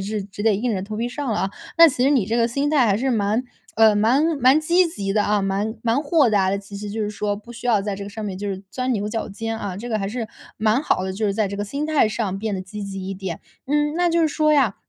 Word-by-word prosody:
是 210 -1 -2
只 205 +1 -8
得 220 - +4
硬 230 +4 -1
着 190 -2 -2
头 210 +2 -6
皮 235 +2 -1
上 285 +3 -5
了 205 - -1
啊。 190 - -1 0.3
那 335 -1 +10
其 255 -3 0
实 275 - +4
你 255 -9 +3
这 225 - 0
个 235 -1 +3
心 275 +5 -1
态 280 -6 +4
还 200 -2 +3
是 265 +3 0
蛮， 215 +1 +1 0.3
呃 220 -1 +5
蛮 235 +8 +3 0.2
蛮 265 +5 +5
积 350 +3 +3
极 200 -11 -3
的 210 0 +2
啊， 210 -1 +2
蛮 200 +3 -1
蛮 235 +3 +1
豁 290 -5 +3
达 195 -3 +2
的。 200 - 0
其 200 0 -10
实 205 0 -6
就 220 +1 -3
是 210 - -2
说， 205 0 -2
不 215 +4 -11
需 240 +1 -7
要 220 -4 +3
在 200 -1 -3
这 200 - -6
个 205 - -8
上 215 0 -6
面 195 -2 -4
就 205 - -4
是 190 -1 -4
钻 255 0 -1
牛 210 -1 -1
角 225 +1 -3
尖 225 +2 -4
啊， 190 -4 -4
这 240 +4 -6
个 220 - 0
还 195 - -2
是， 225 0 -4 0.3
蛮 220 +3 +2
好 245 - +1
的。 190 - -3
就 210 +3 -1
是 200 - +1
在 215 0 +1
这 200 - -5
个 205 - -2
心 280 +9 -3
态 305 -8 +3
上 205 -3 -2
变 215 -1 -2
得 185 - -3
积 205 +3 -8
极 195 -1 -6
一 - - -3
点。 185 -3 -5 0.3
嗯， 295 +2 +1
那 350 0 +2
就 335 - +2
是 320 - +3
说 305 0 +2
呀 260 -9 +3
215 Hz, 320 characters per minute, -22 LUFS, 200-255 Hz, 0.3 s, 那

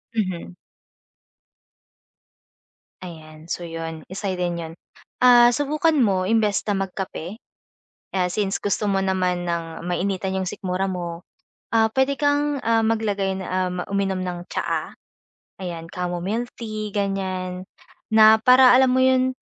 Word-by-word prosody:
Mhm. 185 -5 -3 2.5
Ayan 160 -3 -11
so 175 - -4
'yon, 165 -1 -6
isa 195 +2 -4
rin 175 -1 -2
'yon. 165 -1 -7 0.5
Ah, 240 -1 +7
subukan 305 +3 +1
mo 195 -9 +2
imbes 215 -2 +2
na 205 - +1
magkape, 190 +1 -6 0.8
ah, 180 -1 +2
since 200 0 -1
gusto 205 +1 -1
mo 195 - +1
naman 180 -2 0
ng 165 0 -4
mainitan 190 +1 -1
'yong 190 -1 -2
sikmura 190 -1 -2
mo, 175 -1 -5 0.5
ah, 220 -1 +4
puwede 265 +3 +1
kang, 290 -1 +1
ah, 225 0 +2
maglagay 205 -4 0
na 190 - -6 0.2
ah, - - -5 0.2
uminom 195 -1 0
ng 175 -1 -5
tsaa, - - -2 0.7
ayan 170 -2 -5
chamomile 180 +6 -3
milk - - -22
tea, 215 -2 -5
ganyan. 190 -2 -2 0.5
Na 220 0 +7
para 255 +1 +7
alam 260 0 +5
mo - - +3
'yon, 260 0 +3
195 Hz, 135 wpm, -23 LUFS, 180-225 Hz, 2.5 s, Ah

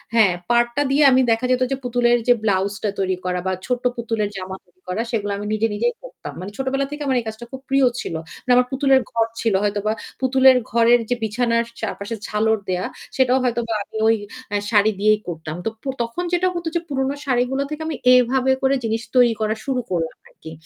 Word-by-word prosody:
হ্যাঁ, 215 -5 +5 0.2
পাড়টা 240 +3 +2
দিয়ে 290 +2 +4
আমি 260 0 +5
দেখা 225 +2 +1
যেত 255 0 +2
যে - - +2
পুতুলের 240 0 +2
যে 245 - +7
ব্লাউজটা 200 +1 0
তৈরি 190 -1 +1
করা 180 0 -1
বা 190 - +1
ছোট্ট 250 -1 -2
পুতুলের 225 -3 -1
জামা 190 0 -5
তৈরি 180 0 -34
করা 185 +5 -1
সেগুলা 205 -3 -1
আমি 205 +1 -5
নিজে, 215 +1 +1
নিজেই 235 +3 0
করতাম। - - -9
মানে 190 +3 -6
ছোটবেলা 270 +1 -1
থেকে 295 0 -6
আমার 265 -2 +1
এই 235 - -6
কাজটা 220 +2 -6
খুব 265 -1 -8
প্রিয় 270 0 +4 0.2
ছিল। - - -5 0.3
মানে 250 - +3
আমার 250 0 +4
পুতুলের 270 -1 +3
ঘর 225 -1 +1
ছিল, 225 -3 +1
হয়তোবা 205 +1 0 0.3
পুতুলের 260 0 +5
ঘরের 235 +1 +5
যে 245 - +2
বিছানার 230 +2 +1 0.2
চারপাশে 215 0 -4
ঝালর 220 +1 +1
দেওয়া 180 0 -1 0.3
সেটাও 260 0 +3
হয়তোবা 235 -2 -1
আমি 220 - -9
ওই 225 - +5 0.3
অ্যা 205 -1 0
শাড়ি 210 0 +4
দিয়েই 215 +1 +4
করতাম। 160 -2 -5
তো - - +1
প - - -27 0.2
তখন 235 +10 -4
যেটা 355 +1 +2
হতো 345 -1 -4
যে - - +3
পুরনো 270 0 -1
শাড়িগুলো 260 +1 +1
থেকে 305 +1 -5
আমি 320 - -2 0.2
এভাবে 255 +1 +3
করে 270 +1 +3
জিনিস 225 0 -1
তৈরি 245 -2 +5
করা 215 0 0
শুরু 260 -2 0
করলাম 165 -2 -1 0.2
আর - - -27
কি। 160 - -6
235 Hz, 210 wpm, -21 LUFS, 210-260 Hz, 0.3 s, যে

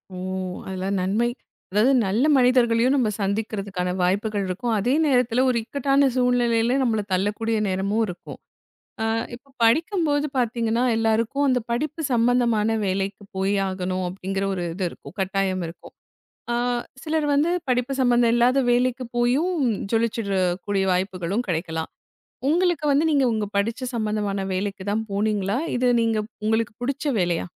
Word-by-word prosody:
ஓ, - - -7 0.5
அதெல்லாம் 190 +1 -2
நன்மை. 215 +6 +1 0.4
அதாது 215 +7 +4 0.2
நல்ல 225 +9 +1
மனிதர்களையும் 250 -1 +4
நம்ம 240 -6 +2
சந்திக்கறதுக்கான 195 -3 -2
வாய்ப்புகள் 200 +3 0
இருக்கும். 225 +6 -2
அதே 245 +6 +1
நேரத்துல 250 -3 +2
ஒரு 240 - +1
இக்கட்டான 275 +2 +2
சூழ்நிலையில 245 0 +2
நம்மள 220 -3 +1
தள்ளக்கூடிய 210 +4 0
நேரமும் 200 +4 0
இருக்கும். 175 -1 -9 0.6
ஆ. - - 0 0.3
இப்ப 265 +3 -15
படிக்கும்போது 305 - +2
பாத்தீங்கன்னா, 235 0 0
எல்லாருக்கும் 225 +5 +1
அந்த 255 -1 +3
படிப்பு 305 +7 -2
சம்பந்தமான 235 -2 +2
வேலைக்கு 195 +2 -2
போய் 195 +1 +1
ஆகணும் 185 0 -2
அப்படிங்கிற 195 +1 -3
ஒரு 175 -1 -3
இது 185 -1 -2
இருக்கும், - - -13
கட்டாயம் 190 -1 0
இருக்கும். 170 +1 -13 0.6
அ - - +1 0.5
சிலரு 310 -1 0
வந்து 300 +4 +2 0.2
படிப்பு 250 +2 +1
சம்பந்த 240 -1 +4
இல்லாத 245 +3 +3
வேலைக்குப் 250 0 0
போயும், 280 +10 +2 0.4
ஜொலிச்சிறக்கூடிய 200 -4 0
வாய்ப்புகளும் 185 +4 -1
கெடைக்கலாம். 160 -2 -3 0.6
உங்களுக்கு 345 -1 +2
வந்து, 290 +3 +3
நீங்க 280 -3 +3
உங்க 215 -2 -1
படிச்ச 230 +5 -1
சம்பந்தமான 210 -3 -1
வேலைக்குத் 200 +1 -3
தான் 220 +1 -1
போனீங்களா? 205 +1 0 0.2
இது, 250 0 +2
நீங்க 225 -1 +1 0.3
உங்களுக்குப் 220 +1 -1
புடிச்ச 275 +3 -2 0.2
வேலையா? 175 -1 0
225 Hz, 135 wpm, -23 LUFS, 195-250 Hz, 0.6 s, அதாது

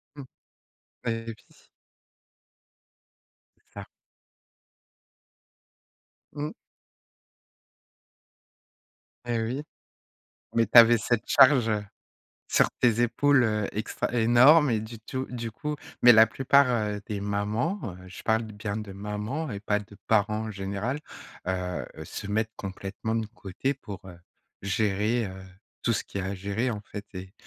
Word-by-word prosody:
Mmh. 140 -2 -8 0.8
Et 115 0 -2
oui. 110 - -10 2.4
Ah. - - -7 2.5
Mmh. 150 +1 -3 2.8
Et 120 -1 0
oui. 125 +6 -2 0.9
Mais 115 - +4
tu 115 +3 +4
avais 120 0 +9
cette 115 +1 -1
charge, 130 -4 +6
heu, 105 -1 0 0.6
sur - - +3
tes 120 -2 +3
épaules, 135 +3 +3
heu, 105 -3 0
extra, 110 +3 -3
énorme 125 +6 +6
et 110 - +1
du 110 +1 -8
tou 130 +4 -4
du 120 -2 -5
coup 150 +7 -4 0.3
mais 120 - +9
la 110 0 +8
plupart, 140 +1 +4
heu, 105 -3 -1
des 105 -2 -3
mamans, 105 - -1 0.2
heu, - - -12
je 90 - -10
parle 110 +1 +2
bien 105 -1 -5
de 105 -2 -6
mamans 105 +10 -4
et 100 - -5
pas 105 0 0
de 105 0 -13
parents 110 0 +2
en - - -5
général, 100 +7 -3 0.5
heu 90 -7 -2
heu, - - -7
se 105 - -7
mettent 110 +2 -1
complètement 100 +3 -5
de 115 -1 -1
côté 110 +5 -3
pour, 105 -7 -9
heu, 90 -2 -11 0.4
gérer, 105 +3 0
heu, 95 -1 -8 0.4
tout 115 - +1
ce - - -1
qu'il 100 - -5
y - - -4
a 95 - -3
à 100 - -3
gérer, 100 +6 -2
en 105 -3 -4
fait 105 0 -8
et 95 +2 -8
110 Hz, 140 wpm, -27 LUFS, 100-120 Hz, 2.8 s, avais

